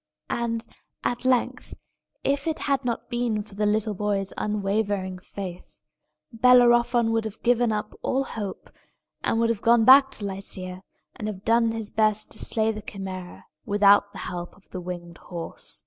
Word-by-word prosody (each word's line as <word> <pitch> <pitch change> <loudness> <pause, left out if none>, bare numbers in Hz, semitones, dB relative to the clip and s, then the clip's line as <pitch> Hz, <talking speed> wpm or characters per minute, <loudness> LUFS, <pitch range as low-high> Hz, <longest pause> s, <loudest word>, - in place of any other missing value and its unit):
And, 230 -1 -1 0.4
at 245 +1 -2
length, 255 -2 0 0.5
if 280 +2 0
it 320 - 0
had 275 -1 0
not 240 -2 -3
been 240 -3 0
for 210 - -15
the 210 +1 0
little 215 +1 +1
boy's 200 -1 -1
unwavering 200 -2 -1
faith, 180 -1 -8 0.5
Bellerophon 240 -1 +5
would 225 0 +1
have 220 -1 -7
given 240 -1 +3
up 210 0 -3
all 270 +1 0
hope, 210 -7 -6 0.5
and 225 - +1
would 230 0 +2
have 220 - -3
gone 235 -1 +4
back 270 +2 +8
to 205 - -5
Lycia, 185 -1 -2 0.3
and 215 - -5
have 200 -2 -6
done 230 0 +3
his 225 -2 -4
best 215 -1 +1
to - - -2
slay 220 0 +2
the 215 -1 -6
Chimæra 190 -3 -7 0.2
without 205 0 +4
the - - -11
help 175 -1 -6
of 195 - -25
the 185 - -5
winged 175 -1 -7
horse. 170 -2 -6
215 Hz, 165 wpm, -25 LUFS, 195-235 Hz, 0.5 s, back